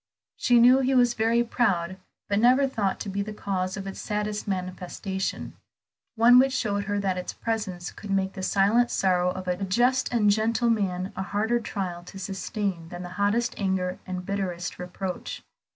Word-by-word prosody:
She 245 Hz, -1 st, +4 dB
knew 250 Hz, +3 st, +7 dB
he 265 Hz, 0 st, +1 dB
was 245 Hz, -1 st, +4 dB
very 230 Hz, +1 st, +2 dB
proud, 190 Hz, -7 st, 0 dB, 0.3 s
but 200 Hz, 0 st, +1 dB
never 255 Hz, +4 st, +5 dB
thought 210 Hz, -7 st, -1 dB
to -, -, -4 dB
be 200 Hz, +1 st, -2 dB
the 210 Hz, +1 st, -5 dB
cause 185 Hz, -1 st, -2 dB
of 195 Hz, -, -5 dB
its 195 Hz, -, -6 dB
saddest 210 Hz, 0 st, -3 dB
manifestation; 185 Hz, 0 st, -4 dB, 0.6 s
one 240 Hz, +2 st, +7 dB
which 265 Hz, 0 st, +3 dB
showed 205 Hz, -5 st, -1 dB
her 205 Hz, +1 st, -1 dB
that 190 Hz, -2 st, -1 dB
its 180 Hz, -, -5 dB
presence 200 Hz, -6 st, -3 dB
could 205 Hz, -, -10 dB
make 195 Hz, -1 st, 0 dB
the 190 Hz, -, -6 dB
silent 205 Hz, +6 st, +3 dB
sorrow 180 Hz, -2 st, +2 dB
of 185 Hz, 0 st, -5 dB
a 180 Hz, +2 st, -1 dB
just 245 Hz, +7 st, +2 dB
and 215 Hz, -4 st, +4 dB
gentle 225 Hz, +3 st, +2 dB
man 190 Hz, -3 st, -1 dB
a -, -, -3 dB
harder 215 Hz, +5 st, 0 dB
trial 185 Hz, -6 st, -4 dB
to 195 Hz, -, -10 dB
sustain 195 Hz, -2 st, -3 dB
than 175 Hz, +1 st, -7 dB
the 175 Hz, -, -7 dB
hottest 205 Hz, +6 st, 0 dB
anger, 190 Hz, -2 st, -1 dB
the 185 Hz, -, -5 dB
bitterest 180 Hz, -2 st, -3 dB
reproach. 180 Hz, +1 st, -5 dB
200 Hz, 180 wpm, -26 LUFS, 185-230 Hz, 0.6 s, knew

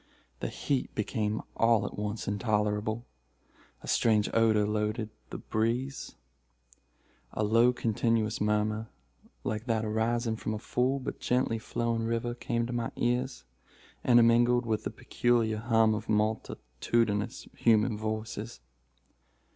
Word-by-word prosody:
The -, -, -2 dB
heat 135 Hz, -3 st, -2 dB
became 105 Hz, 0 st, -1 dB
all 115 Hz, -1 st, +3 dB
at -, -, -5 dB
once 105 Hz, +1 st, -4 dB
intolerable. 105 Hz, +1 st, 0 dB, 0.8 s
A -, -, -9 dB
strange 105 Hz, -2 st, +2 dB
odor 110 Hz, -2 st, +4 dB
loaded 105 Hz, +1 st, -1 dB, 0.2 s
the -, -, -5 dB
breeze. 120 Hz, +5 st, -2 dB, 1.2 s
A 110 Hz, -, -1 dB
low, 115 Hz, +3 st, +5 dB
continuous 115 Hz, -2 st, 0 dB
murmur, 105 Hz, +1 st, 0 dB, 0.5 s
like 110 Hz, +1 st, -3 dB
that 110 Hz, -2 st, +1 dB
arising 110 Hz, +1 st, 0 dB
from 110 Hz, -, -3 dB
a -, -, -3 dB
full, 125 Hz, +4 st, 0 dB
but 130 Hz, -, -5 dB
gently 125 Hz, -2 st, +1 dB
flowing 115 Hz, 0 st, -1 dB
river, 115 Hz, +1 st, -1 dB
came 120 Hz, -1 st, -2 dB
to 120 Hz, -, -5 dB
my 120 Hz, -1 st, -2 dB
ears, 120 Hz, -, -1 dB, 0.6 s
intermingled 120 Hz, 0 st, +5 dB
with 110 Hz, -2 st, -1 dB
the -, -, 0 dB
peculiar 115 Hz, -3 st, 0 dB
hum 115 Hz, -1 st, +3 dB
of 110 Hz, +1 st, -5 dB
multitudinous 105 Hz, -, -1 dB
human 110 Hz, 0 st, +3 dB
voices. 110 Hz, -, -4 dB
110 Hz, 125 wpm, -29 LUFS, 105-120 Hz, 1.2 s, low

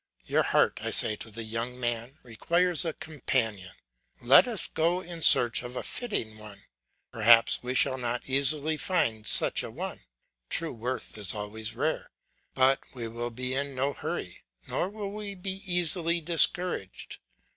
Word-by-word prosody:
Your -, -, 0 dB
heart, -, -, 0 dB
I -, -, -2 dB
say 105 Hz, -, +7 dB
to 115 Hz, -, -10 dB
the 115 Hz, +2 st, -8 dB
young 115 Hz, +3 st, -5 dB
man, 120 Hz, +2 st, -3 dB
requires 170 Hz, +10 st, -1 dB
a 165 Hz, -, -3 dB
companion; 115 Hz, -12 st, -3 dB, 0.5 s
let 135 Hz, -, +5 dB
us 225 Hz, -6 st, -1 dB
go 170 Hz, +3 st, -1 dB
in 170 Hz, -2 st, -9 dB
search 120 Hz, -5 st, +6 dB
of 125 Hz, 0 st, -9 dB
a -, -, -5 dB
fitting 110 Hz, -, -4 dB
one; 105 Hz, -2 st, -12 dB, 0.5 s
perhaps 115 Hz, +1 st, +4 dB
we 125 Hz, +1 st, -5 dB
shall 130 Hz, 0 st, +1 dB
not 120 Hz, 0 st, -3 dB
easily 145 Hz, +3 st, +1 dB
find 115 Hz, -, -2 dB
such -, -, +8 dB
a -, -, -7 dB
one, -, -, -7 dB, 0.5 s
true 165 Hz, -1 st, -3 dB
worth 120 Hz, -1 st, -6 dB
is 100 Hz, 0 st, -1 dB
always 105 Hz, +1 st, -6 dB
rare, -, -, -3 dB, 0.5 s
but 135 Hz, +1 st, +3 dB, 0.2 s
we 120 Hz, -2 st, -6 dB
will 120 Hz, +1 st, -6 dB
be 125 Hz, +2 st, -4 dB
in 140 Hz, 0 st, -3 dB
no 140 Hz, +2 st, -2 dB
hurry, -, -, -7 dB, 0.3 s
nor 180 Hz, -, -2 dB
will 205 Hz, -1 st, -7 dB
we 205 Hz, -1 st, -8 dB
be 190 Hz, +1 st, -5 dB
easily 170 Hz, -1 st, +1 dB
discouraged. 170 Hz, -, -1 dB
130 Hz, 160 wpm, -27 LUFS, 115-170 Hz, 0.5 s, such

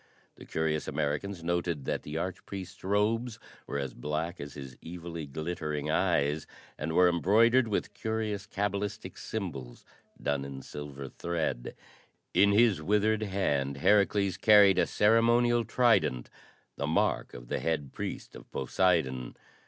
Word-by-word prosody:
The -, -, -13 dB
curious 80 Hz, -1 st, -1 dB
Americans 80 Hz, +5 st, -2 dB
noted 85 Hz, -4 st, -1 dB
that -, -, -1 dB
the 75 Hz, +2 st, -6 dB
arch 90 Hz, +2 st, -3 dB
priest's 95 Hz, -2 st, -8 dB
robes 110 Hz, +4 st, +1 dB, 0.3 s
were -, -, -3 dB
as 70 Hz, -3 st, -3 dB
black 75 Hz, +6 st, -3 dB
as 70 Hz, 0 st, -8 dB
his 70 Hz, -3 st, -8 dB
evilly 85 Hz, -2 st, -6 dB
glittering 75 Hz, 0 st, -3 dB
eyes, 75 Hz, 0 st, +1 dB, 0.3 s
and 75 Hz, +3 st, -4 dB
were 90 Hz, +1 st, +6 dB
embroidered 115 Hz, +8 st, +4 dB
with 105 Hz, -, -2 dB
curious 110 Hz, -2 st, -3 dB
cabalistic 100 Hz, 0 st, -3 dB
symbols 75 Hz, -, -6 dB, 0.3 s
done 70 Hz, -1 st, -1 dB
in 70 Hz, -1 st, -7 dB
silver 70 Hz, -2 st, -7 dB
thread. 80 Hz, -4 st, -3 dB, 0.6 s
In 100 Hz, 0 st, +5 dB
his 105 Hz, -5 st, +4 dB
withered 105 Hz, +5 st, +2 dB
hand 75 Hz, -10 st, 0 dB
Herakles 100 Hz, +2 st, +3 dB
carried 105 Hz, -3 st, +6 dB
a -, -, +3 dB
ceremonial 115 Hz, +2 st, +4 dB
trident 115 Hz, -, +2 dB, 0.5 s
the -, -, -2 dB
mark -, -, 0 dB
of -, -, -10 dB
the -, -, -2 dB
Head 75 Hz, -5 st, -2 dB
Priest -, -, -6 dB
of -, -, -12 dB
Poseidon. 65 Hz, -4 st, 0 dB
85 Hz, 135 wpm, -30 LUFS, 75-105 Hz, 0.6 s, were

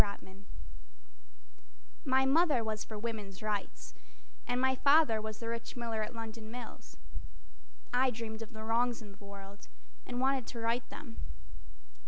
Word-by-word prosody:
Oaks 200 Hz, -1 st, -4 dB
Tutt 190 Hz, -, -13 dB, 1.7 s
My 265 Hz, 0 st, +5 dB
mother 285 Hz, -3 st, +5 dB
was 215 Hz, -1 st, -1 dB
for 215 Hz, -, -6 dB
woman's 210 Hz, -3 st, -4 dB
rights 200 Hz, -, -2 dB, 0.5 s
And 245 Hz, -, +2 dB
my 260 Hz, 0 st, +5 dB
father 280 Hz, -4 st, +6 dB
was 215 Hz, 0 st, -4 dB
the 230 Hz, -, -5 dB
rich 230 Hz, 0 st, -3 dB
miller 230 Hz, -2 st, -1 dB
at 215 Hz, -, -3 dB
London 225 Hz, -1 st, -5 dB
Mills. 245 Hz, 0 st, -8 dB, 1.0 s
I 255 Hz, +1 st, +5 dB
dreamed 225 Hz, -2 st, -4 dB
of 225 Hz, +1 st, -6 dB
the 220 Hz, -1 st, -7 dB
wrongs 235 Hz, +1 st, +2 dB
of 205 Hz, -1 st, -12 dB
the -, -, -13 dB
world 200 Hz, 0 st, -9 dB, 0.4 s
and 245 Hz, 0 st, -2 dB
wanted 265 Hz, -1 st, +3 dB
to 235 Hz, -, -5 dB
right 230 Hz, +1 st, +1 dB
them. 230 Hz, -6 st, -8 dB
230 Hz, 155 wpm, -34 LUFS, 215-245 Hz, 1.7 s, father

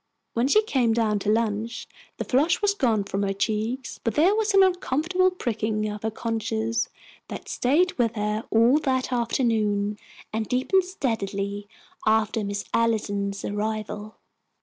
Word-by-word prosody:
When 235 Hz, +3 st, +1 dB
she 430 Hz, +10 st, +4 dB
came 255 Hz, -, +2 dB
down 220 Hz, -2 st, +1 dB
to 205 Hz, -, -2 dB
lunch, 225 Hz, +1 st, -1 dB, 0.3 s
the -, -, -2 dB
flush 290 Hz, +7 st, +2 dB
was 410 Hz, -1 st, +2 dB
gone 230 Hz, -, +1 dB
from 195 Hz, 0 st, -3 dB
her 195 Hz, -1 st, 0 dB
cheeks, 220 Hz, +6 st, -2 dB
but 230 Hz, -2 st, -1 dB
there 345 Hz, +7 st, +5 dB
was 435 Hz, 0 st, +1 dB
an 390 Hz, -, +8 dB
uncomfortable 360 Hz, 0 st, +2 dB
pricking 220 Hz, -, -2 dB
of 210 Hz, 0 st, -5 dB
her 220 Hz, -, -1 dB
conscience 225 Hz, 0 st, -2 dB, 0.4 s
that -, -, -7 dB
stayed 320 Hz, +9 st, +2 dB
with 230 Hz, -1 st, +2 dB
her 210 Hz, +1 st, -1 dB
all 235 Hz, +6 st, +5 dB
that 260 Hz, -3 st, 0 dB
afternoon, 215 Hz, -4 st, 0 dB, 0.3 s
and 220 Hz, -1 st, -1 dB
deepened 355 Hz, +10 st, +2 dB
steadily 205 Hz, -, -3 dB, 0.4 s
after 220 Hz, 0 st, +2 dB
Miss 200 Hz, 0 st, -3 dB
Allison's 205 Hz, -3 st, 0 dB
arrival. 215 Hz, 0 st, -3 dB
225 Hz, 150 wpm, -25 LUFS, 210-260 Hz, 0.4 s, an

